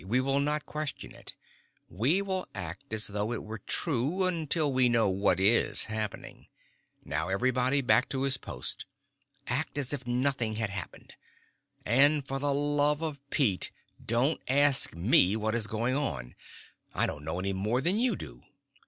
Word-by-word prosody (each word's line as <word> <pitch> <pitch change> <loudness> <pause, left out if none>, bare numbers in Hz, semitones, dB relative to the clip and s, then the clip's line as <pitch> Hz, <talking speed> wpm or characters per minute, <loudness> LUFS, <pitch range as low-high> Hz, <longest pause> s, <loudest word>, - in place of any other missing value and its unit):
We 110 +7 0
will 135 +1 +1
not 150 +1 0
question 150 -2 -5
it. - - -9 0.5
We 135 - +1
will 190 -2 -3
act 90 -1 -7
as 110 -1 0
though 105 +2 -2
it - - -5
were 110 +1 -7
true, 150 - 0
until 160 -4 +1
we 130 -1 +3
know 115 -2 +3
what 95 -1 +1
is 105 +5 +4
happening. 110 -2 -5 0.6
Now 80 +5 -2
everybody 130 +6 +1
back 125 - +3
to 135 -1 -1
his 135 -2 +3
post. 60 - -6 0.6
Act 145 +5 -2
as 140 -1 0
if 130 -4 -5
nothing 120 -3 0
had 110 -2 -2
happened. 100 -2 -8 0.7
And 140 +5 +4
for 135 0 -3
the 145 +1 0
love 145 +1 +1
of 150 -3 -3
Pete, 110 - +2 0.3
don't 120 +7 +1
ask 140 - +4
me 95 +2 +4
what 110 0 -1
is 115 -2 0
going 115 +4 -1
on. 65 - -3 0.6
I - - +2
don't 75 - -5
know 80 +3 -4
any 95 +1 -2
more 105 +6 0
than 180 +10 +2
you 250 +1 +2
do." - - -10
125 Hz, 165 wpm, -29 LUFS, 105-145 Hz, 0.7 s, is